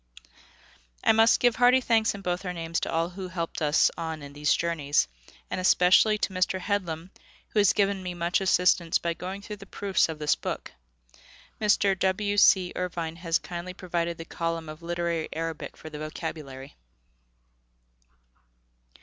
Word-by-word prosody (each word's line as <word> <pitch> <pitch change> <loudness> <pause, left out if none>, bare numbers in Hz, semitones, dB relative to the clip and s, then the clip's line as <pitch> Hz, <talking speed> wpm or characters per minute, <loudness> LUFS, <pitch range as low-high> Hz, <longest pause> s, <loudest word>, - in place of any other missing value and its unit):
I - - +6
must 225 +1 +5
give 245 -2 +3
hearty 245 +2 +6
thanks 225 -4 +2
in 200 - -8
both 180 0 -2
our 180 -2 -3
names 165 -1 -3
to - - -3
all 165 +1 0
who 185 +1 -7
helped 170 -2 -4
us 150 0 +3
on 160 -2 -5
in 140 0 -10
these 150 +1 0
journeys, 150 - +1 0.4
and 185 - -3
especially 185 +4 +5
to 200 - -2
Mr. 185 +1 0
Headlam, 185 -3 -3 0.4
who 215 - 0
has 205 -2 +5
given 200 -1 +1
me 180 -1 -5
much 175 +2 0
assistance 180 -2 +3
by 170 0 -2
going 190 +4 -7
through 210 0 -7
the 195 0 -13
proofs 195 -4 0
of 160 - -5
this 150 -1 +2
book. - - -5 0.9
Mr. 205 -2 +3
W. 205 +2 0
C. 190 -3 +5
Irvine 170 -2 -3
has 165 -1 +1
kindly 180 +1 -7
provided 170 -2 -2
the 165 - -8
column 165 -1 -3
of 155 +2 -9
literary 170 -1 -2
Arabic 165 0 -5
for 155 - -10
the 150 - -7
vocabulary. 150 -3 -7
175 Hz, 165 wpm, -27 LUFS, 165-195 Hz, 0.9 s, I